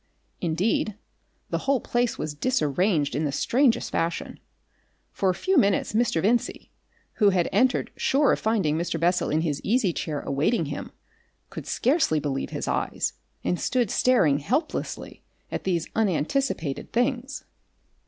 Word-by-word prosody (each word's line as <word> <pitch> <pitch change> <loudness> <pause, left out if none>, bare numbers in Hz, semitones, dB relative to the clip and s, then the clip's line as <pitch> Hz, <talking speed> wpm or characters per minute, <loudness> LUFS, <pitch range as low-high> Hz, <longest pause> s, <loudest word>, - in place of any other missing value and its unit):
Indeed 185 +5 0 0.6
the - - 0
whole 275 -1 +1
place 240 0 -1
was 155 -1 -3
disarranged 165 - +1
in 150 - 0
the 145 - 0
strangest 245 - +2
fashion. 165 +1 -2 0.7
For 195 - 0
a 185 - +1
few 380 - +1
minutes 200 -4 +1
Mr. 215 -8 +1
Vincey, 230 +4 0 0.5
who 205 - +7
had 180 -3 +2
entered 250 +6 +2
sure 280 +1 +3
of - - +1
finding 205 -9 +1
Mr. 170 0 -2
Bessel 175 +2 +1
in 155 +1 +1
his 150 -4 -2
easy 215 -5 +2
chair 150 -2 -3
awaiting 155 - 0
him, 145 0 -6 0.6
could - - -7
scarcely 255 - +2
believe 140 -2 -2
his - - -4
eyes, - - -1 0.3
and 180 - 0
stood 245 -5 0
staring 170 - +3
helplessly 260 - -3 0.3
at - - -4
these 170 -4 0
unanticipated 190 - -1
things. 250 +2 -1
190 Hz, 145 wpm, -25 LUFS, 155-245 Hz, 0.7 s, who